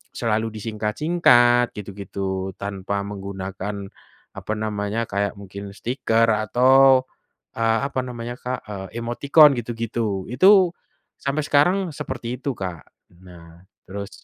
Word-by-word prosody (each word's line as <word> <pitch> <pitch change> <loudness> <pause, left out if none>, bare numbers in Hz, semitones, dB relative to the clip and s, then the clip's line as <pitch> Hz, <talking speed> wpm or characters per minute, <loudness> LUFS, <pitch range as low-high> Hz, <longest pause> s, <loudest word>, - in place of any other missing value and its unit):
selalu 110 -1 0
disingkat-singkat 120 +3 +2
gitu 105 -1 -7
gitu 100 -1 -5 0.3
tanpa 100 0 -3
menggunakan, 100 0 -6 0.5
apa 110 - -4
namanya 110 +1 -2
kayak 100 0 -2
mungkin 100 0 -9
stiker 115 0 0
atau, 130 +4 +4 0.5
eee, 115 0 +2
apa 130 - -3
namanya, 120 -1 -6
Kak? 125 +1 -4 0.3
emoticon 140 +5 +4
gitu 120 0 -4
gitu 115 -4 -3
itu, 185 - +5 0.4
sampai 145 +2 -1
sekarang 150 +7 +4 0.2
seperti 125 -4 -5
itu 140 - -2
Kak 90 -4 -7 0.3
nah 85 -2 -15 0.2
terus 100 +1 -6
115 Hz, 115 wpm, -22 LUFS, 100-125 Hz, 0.5 s, itu